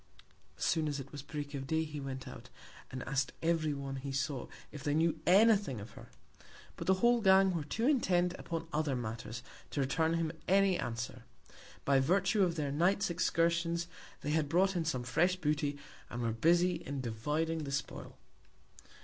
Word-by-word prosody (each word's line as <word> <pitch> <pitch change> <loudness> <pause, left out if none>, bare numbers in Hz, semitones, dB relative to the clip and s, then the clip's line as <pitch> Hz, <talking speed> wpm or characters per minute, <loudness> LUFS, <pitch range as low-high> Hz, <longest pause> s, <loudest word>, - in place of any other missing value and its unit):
As - - -2
soon 160 -2 +2
as 145 -1 -2
it 135 +1 -8
was 145 - -7
Break 145 +1 -6
of 135 -1 -5
Day 160 +2 +1
he 150 -2 -6
went 135 -1 -6
out, - - -10 0.4
and 130 0 -5
ask'd 135 +1 0
every 165 -2 +2
one 135 -1 -5
he 135 +1 -5
saw 135 -1 -2 0.2
if 150 - -8
they 145 0 +1
knew 160 0 +2
any 215 +5 +7
Thing 170 - -4
of 100 +3 -9
her: - - -13 0.7
But - - -7
the 190 - +5
whole 240 -1 +5
Gang 190 -1 +6
were 165 -3 -2
too 225 +11 -2
intent 180 -11 +2
upon 165 -1 -4
other 150 -3 0
Matters, 115 -1 -5 0.3
to - - -4
return 160 +5 +1
him 165 -2 0 0.2
any 195 0 +4
Answer. 120 +1 -4 0.6
By 140 -1 +4
Virtue 195 +8 +2
of 175 -3 +2
their 145 -3 -2
Night's 175 +6 +2
Excursions, 170 0 +1 0.4
they 150 - -2
had 155 -2 +1
brought 190 +4 +3
in 170 -2 0
some 130 -6 -1
fresh 175 +10 +2
Booty, 150 -4 -1 0.3
and 120 0 -4
were 115 - +1
busy 175 +8 +3
in 140 -1 -5
dividing 150 +8 -1
the 140 - -5
Spoil. 135 - -4
155 Hz, 185 wpm, -33 LUFS, 135-175 Hz, 0.7 s, any